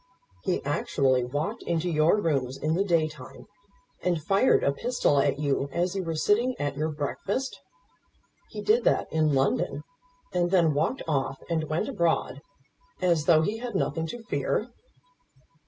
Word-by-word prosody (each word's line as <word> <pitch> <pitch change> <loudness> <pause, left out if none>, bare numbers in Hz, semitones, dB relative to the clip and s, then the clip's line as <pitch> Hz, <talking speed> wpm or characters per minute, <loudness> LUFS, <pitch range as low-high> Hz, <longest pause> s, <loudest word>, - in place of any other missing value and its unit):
"He 185 -3 -1
actually 135 -3 +1
walked 145 +6 -3
into 170 0 -1
your 160 +3 +3
rooms 135 -7 -1
in 155 +1 -1
the 185 +4 +2
day 170 -5 +2
time, 155 -1 -12 0.6
and 175 -2 0
fired 195 - +3
a 140 - +3
pistol 190 - +1
at 140 0 +2
you 140 -1 0
as 175 +4 -1
you 190 - -1
were 165 -2 -3
sitting 230 +10 +2
at 145 -1 -2
your 155 +3 -1
breakfast! 190 - -3 0.9
He - - -7
did 445 +3 +3
that - - +1
in 155 -2 +2
London, 135 - 0 0.5
and 175 -1 +1
then 170 -4 +3
walked 160 - -1
off 135 -3 -1
and 160 -1 0
went 160 +7 -1
abroad, 170 - 0 0.6
as 170 -4 +2
though 160 -2 +5
he 215 +6 -2
had 240 -3 -5
nothing 165 -3 -1
to 235 +7 -7
fear!" 210 - -1
160 Hz, 160 wpm, -27 LUFS, 145-195 Hz, 0.9 s, though